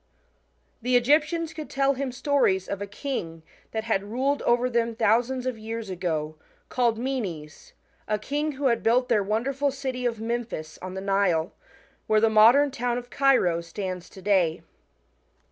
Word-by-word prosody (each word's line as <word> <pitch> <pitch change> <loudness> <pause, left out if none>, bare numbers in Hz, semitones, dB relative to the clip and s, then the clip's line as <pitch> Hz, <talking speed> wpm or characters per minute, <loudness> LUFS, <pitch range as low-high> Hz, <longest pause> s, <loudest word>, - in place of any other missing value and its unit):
The 250 +2 +1
Egyptians 310 +6 +2
could 310 -1 -7
tell 275 0 +2
him 270 -1 -3
stories 250 -8 +1
of 200 0 -4
a 200 - -3
king, 200 - -5 0.3
that 220 -1 -3
had 220 -4 0
ruled 270 +5 0
over 240 +1 +3
them 235 -2 0
thousands 235 +4 +1
of 255 -3 -3
years 220 -2 -5
ago, 160 -4 -3 0.3
called 235 -3 +1
Menes, 200 - -5 0.3
a 215 - +1
king 290 +7 -2
who 280 +1 -4
had 235 -3 +2
buUt 245 +3 +2
their 225 -4 +3
wonderful 255 +8 0
city 260 -2 -3
of 230 -2 -3
Memphis 225 -8 -4
on 185 0 -6
the 190 - -4
Nile, 195 -3 +1 0.5
where 215 0 +4
the* 220 0 +3
modern 240 +7 +6
town 245 -2 -1
of 245 0 -8
Cairo 250 -12 +3
stands 180 +1 -6
to 190 - -13
day. 180 -5 +2
230 Hz, 160 wpm, -26 LUFS, 195-260 Hz, 0.5 s, modern